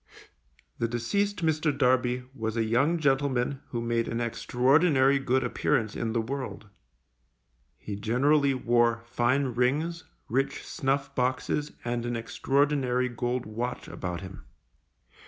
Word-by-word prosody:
The 115 - +1
deceased 180 - -1
Mr. 155 -1 +2
Darby 125 -2 +2
was 110 -3 -3
a 115 - +2
young 130 +10 +2
gentleman 135 -3 +1
who 120 - -3
made 115 0 0
an 115 - -2
extraordinary 130 +5 +3
good 130 -1 +1
appearance 115 -8 0
in 115 -1 -2
the 115 - +1
world. 130 -2 -5 1.1
He 105 - -6
generally 135 +7 +2
wore 120 -2 +2
fine 125 +4 +1
rings, 150 +8 0 0.2
rich 135 +4 -1
snuff 135 -1 -1
boxes, 130 +3 -1
and 120 0 -1
an 120 - -2
extraordinary 130 +1 +1
gold 120 +1 -2
watch 120 +3 -4
about 90 -2 -5
him. 95 -9 -10
125 Hz, 125 wpm, -28 LUFS, 115-140 Hz, 1.1 s, extraordinary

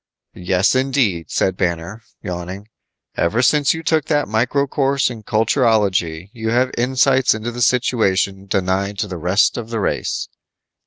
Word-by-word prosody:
"Yes, 90 +2 +1
indeed," 130 - 0
said 95 - 0
Banner, 90 +4 -3 0.2
yawning, 90 +2 -6 0.5
"ever 110 +9 +1
since 145 +2 +3
you 165 - -7
took 160 -1 +1
that 145 -2 0
micro 120 +6 +1
course 135 -1 0
in 115 -2 -8
culturology 105 - +1
you 110 -2 -4
have 125 +2 +1
insights 130 0 +2
into 110 +2 -4
the 120 +1 -6
situation 100 -6 +1
denied 95 +1 -1
to 105 - -2
the 95 -2 -6
rest 90 +9 +2
of 115 -1 -6
the 115 -1 -3
race." 100 - -2
110 Hz, 150 wpm, -19 LUFS, 95-130 Hz, 0.5 s, since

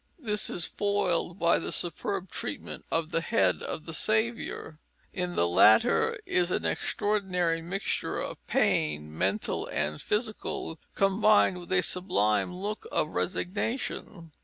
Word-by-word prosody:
This 210 -9 -1
is 175 - -1
foiled 195 -4 0
by 170 -1 +3
the - - -4
superb 185 +2 -1
treatment - - -5
of 165 0 -1
the 165 - +1
head 95 - +2
of 155 - -5
the 165 - -6
Saviour. 220 -6 -1 0.3
In 180 -2 -3
the 85 - +3
latter 100 +5 +5
is 180 -1 +1
an - - -1
extraordinary 180 -5 0
mixture 185 +4 -2
of - - -5
pain, 75 0 +1
mental 95 +5 -1
and 75 0 -2
physical, 210 -6 -2 0.2
combined 195 -1 +4
with 175 - -11
a 185 -1 +3
sublime 180 - +1
look 205 - -5
of - - +1
resignation. 190 - -3
180 Hz, 135 wpm, -29 LUFS, 155-205 Hz, 0.3 s, latter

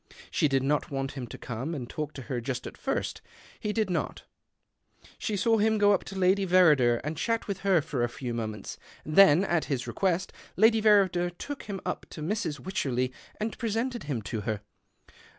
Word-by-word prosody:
She - - +3
did 135 -2 +1
not 150 +4 +1
want 135 -1 -2
him 130 -4 -6
to - - -9 0.2
!ome 135 +9 -3
and 125 -5 -5
talk 150 +3 -4
to 135 - -8
her 120 0 -3
just 125 +1 -3
at - - -7
first. - - -2 0.4
He 210 - -2
did 215 -3 0
lot. 165 - -2 1.0
She 210 -3 -1
saw 225 +3 +3
him 220 +1 +3
go 205 0 +5
up 195 - +1
to 195 - -7
Lady 190 +1 +3
Verrider 150 -11 +5
md 150 +2 -3
chat 230 +6 -1
with 200 -2 -3
her 195 -4 +3
for 130 -3 -2
a 120 - +1
few 120 0 -5
moments. 110 -3 -5 0.3
Then, 155 0 +6
Lt 170 -4 +1
his 130 -4 -1
recjuest, 185 -1 0 0.3
Lady 220 +2 +5
Verrider 195 -5 +4
took 290 -1 -6
him 195 -2 -3
up - - -3
to 155 - -7
^rs. 165 -4 -2
Wycherley 130 -9 -1 0.3
and 215 +1 -2
presented 235 - -2
him 130 -7 -3
to 110 0 -3
her. 110 -1 -2
165 Hz, 195 wpm, -28 LUFS, 130-200 Hz, 1.0 s, Then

